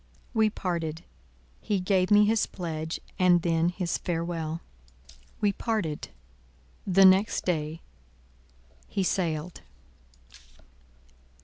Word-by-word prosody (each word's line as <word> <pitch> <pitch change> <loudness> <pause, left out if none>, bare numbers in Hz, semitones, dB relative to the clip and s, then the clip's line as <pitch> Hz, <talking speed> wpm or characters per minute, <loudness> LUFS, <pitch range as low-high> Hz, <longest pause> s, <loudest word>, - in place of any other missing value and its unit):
We 220 -2 +3
parted: 170 -5 -3 0.6
he 205 -2 0
gave 185 0 +1
me 210 0 +6
his 220 +1 +2
pledge, 160 -3 -4 0.2
and 175 -2 +4
then 165 0 +2
his 180 -1 -2
farewell. 165 -1 -3 0.8
We 205 -1 +2
parted: 205 -11 -2 0.8
the 195 +1 +6
next 190 +3 +4
day—he 65 - -6
sailed. 170 -3 -2
175 Hz, 90 wpm, -27 LUFS, 155-190 Hz, 0.8 s, me